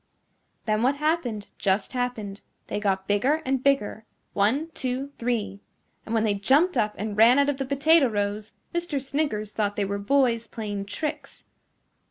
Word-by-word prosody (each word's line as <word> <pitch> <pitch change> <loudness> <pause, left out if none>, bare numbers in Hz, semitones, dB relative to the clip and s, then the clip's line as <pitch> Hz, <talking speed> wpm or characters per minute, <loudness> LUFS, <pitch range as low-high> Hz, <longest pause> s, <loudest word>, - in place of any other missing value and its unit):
Then 215 0 +1
what 260 +4 +3
happened 285 -9 -1
just 195 +3 0
happened. 225 -5 -3 0.2
They - - -3
got 195 -2 -1
bigger 260 +10 +2
and 265 -1 0
bigger 265 -6 +1 0.3
one, 260 +11 +1
two, 260 +2 -3
three. 210 -5 -2 0.5
And 225 - -1
when 220 - +2
they 215 -2 +2
jumped 275 - +3
up 210 0 +1
and 210 0 -3
ran 230 +4 +6
out 280 0 +4
of 285 - -1
the 270 - -2
potato 285 +2 +4
rows, 205 0 -2 0.2
Mr. 345 -4 -1
Sniggers 270 -6 -2
thought 205 -2 -1
they 205 - 0
were 200 +1 -3
boys 235 0 +2
playing 205 -4 -5
tricks. 305 +7 -5
230 Hz, 165 wpm, -25 LUFS, 205-280 Hz, 0.5 s, ran